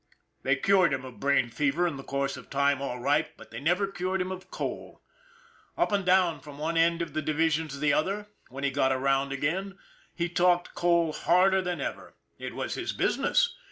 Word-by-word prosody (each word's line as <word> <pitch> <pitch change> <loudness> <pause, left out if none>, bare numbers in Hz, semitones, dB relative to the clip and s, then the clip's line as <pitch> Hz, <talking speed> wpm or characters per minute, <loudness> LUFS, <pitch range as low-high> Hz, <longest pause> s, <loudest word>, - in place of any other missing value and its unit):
They 135 0 +2
cured 185 +4 +3
him 130 0 -7
of 130 -2 -11
brain 135 -3 +2
fever 145 +6 +1
in 165 -4 -1
the 135 - -8
course 140 0 -2
of - - -12
time 140 0 +1
all 125 -3 -3
right, 145 +5 +1
but - - -14
they 115 - -6
never 175 +8 +2
cured 190 -1 -2
him 185 0 -2
of 185 0 -8
coal. - - -6 0.7
Up - - +1
and 200 -1 +1
down 180 -2 +3
from 145 -2 -12
one 160 +3 -2
end 170 +1 +3
of 155 -4 -8
the 155 - -1
division 160 +1 +1
to 140 -2 -7
the 145 0 +2
other, 195 +7 0 0.2
when 135 +2 -7
he 140 - +1
got 135 -1 +2
around 135 +1 +1
again, 185 +8 -2 0.4
he 170 0 -1
talked 175 0 +2
coal 170 -2 +2
harder 190 +4 +3
than 180 -1 -3
ever - - -5 0.2
it - - -6
was - - -3
his - - -3
business. - - +1
160 Hz, 205 wpm, -28 LUFS, 140-180 Hz, 0.7 s, cured